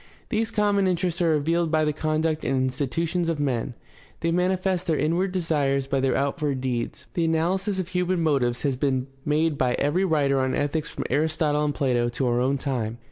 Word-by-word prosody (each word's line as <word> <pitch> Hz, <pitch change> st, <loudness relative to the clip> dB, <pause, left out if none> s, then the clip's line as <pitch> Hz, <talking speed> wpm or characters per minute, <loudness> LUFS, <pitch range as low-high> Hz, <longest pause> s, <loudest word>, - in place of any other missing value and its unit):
These 220 Hz, +1 st, 0 dB
common 205 Hz, -3 st, +2 dB
interests 180 Hz, -1 st, -1 dB
are 170 Hz, -, +3 dB
revealed 165 Hz, +3 st, +1 dB
by 155 Hz, -1 st, +2 dB
the 150 Hz, -, 0 dB
conduct 155 Hz, +1 st, -1 dB
and 135 Hz, -, 0 dB
institutions 150 Hz, +7 st, -1 dB
of 165 Hz, -3 st, -1 dB
men; 125 Hz, -4 st, -1 dB, 0.5 s
they 165 Hz, -, +1 dB
manifest 185 Hz, +1 st, 0 dB
their 160 Hz, -3 st, +2 dB
inward 175 Hz, +5 st, +1 dB
desires 145 Hz, -7 st, 0 dB
by 135 Hz, 0 st, 0 dB
their 130 Hz, -1 st, +1 dB
outward 140 Hz, 0 st, -1 dB
deeds. 125 Hz, -2 st, -3 dB
The 170 Hz, -, +1 dB
analysis 185 Hz, +5 st, +1 dB
of 185 Hz, -1 st, -3 dB
human 180 Hz, 0 st, 0 dB
motives 135 Hz, -6 st, +1 dB
has 140 Hz, -3 st, +1 dB
been 130 Hz, -1 st, 0 dB, 0.2 s
made 150 Hz, 0 st, +1 dB
by 125 Hz, -1 st, +2 dB
every 150 Hz, +7 st, +1 dB
writer 145 Hz, -6 st, +2 dB
on 130 Hz, 0 st, 0 dB
ethics 145 Hz, +2 st, -1 dB
from -, -, -5 dB
Aristotle 150 Hz, +1 st, +1 dB
and 145 Hz, -, -1 dB
Plato 125 Hz, -4 st, +1 dB
to 125 Hz, +3 st, -2 dB
our 120 Hz, 0 st, +1 dB
own 135 Hz, +2 st, +1 dB
time. 120 Hz, -5 st, -3 dB
155 Hz, 190 wpm, -25 LUFS, 135-170 Hz, 0.5 s, are